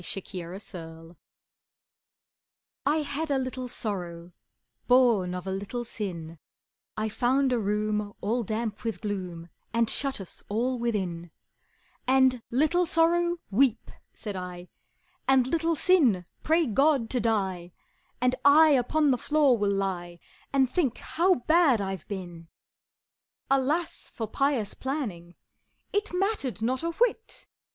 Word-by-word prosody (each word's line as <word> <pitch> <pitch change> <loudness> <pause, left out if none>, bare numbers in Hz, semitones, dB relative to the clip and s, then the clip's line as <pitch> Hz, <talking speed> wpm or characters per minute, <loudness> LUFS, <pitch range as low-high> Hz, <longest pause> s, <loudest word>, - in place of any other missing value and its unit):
The 185 - -1
Penitent 170 -3 -8 1.7
I 300 +2 +3
had 295 +2 -3
a 280 - +2
little 255 -1 -3
Sorrow, 175 -7 -5 0.6
Born 235 -8 +4
of 180 - -6
a 190 - -3
little 205 +5 -4
Sin, 170 -8 -6 0.6
I 215 0 0
found 255 +4 +1
a 240 - +1
room 210 0 -1
all 230 +4 0
damp 220 0 -3
with 225 -2 -3
gloom 180 -5 -5 0.3
And 230 0 +3
shut 275 -4 -1
us 190 - -7
all 245 +4 0
within; 185 -8 -2 0.8
And, 260 -1 +4
"Little 315 +8 +2
Sorrow, 345 +2 +2
weep," 235 +1 +2 0.2
said 205 -3 -6
I, 180 -1 -7 0.6
"And, 265 -2 +5
Little 330 +4 0
Sin, 270 - +3 0.2
pray 325 +1 +3
God 275 +1 +2
to 250 - +1
die, 190 -6 -1 0.5
And 250 +1 +2
I 310 +3 +7
upon 285 +2 +3
the 250 - +1
floor 295 -3 +3
will 205 -3 0
lie 185 -3 -2 0.3
And 270 -1 +3
think 280 -3 0
how 360 +3 +2
bad 315 -7 +4
I've 195 -4 -4
been!" 175 -4 -7 1.0
Alas 285 +6 0
for 225 - -4
pious 255 -3 0
planning 210 - -4 0.6
It 415 +1 0
mattered 360 - -1
not 255 +3 0
a 335 - -1
whit! 450 +5 -1
235 Hz, 130 wpm, -27 LUFS, 195-280 Hz, 1.7 s, I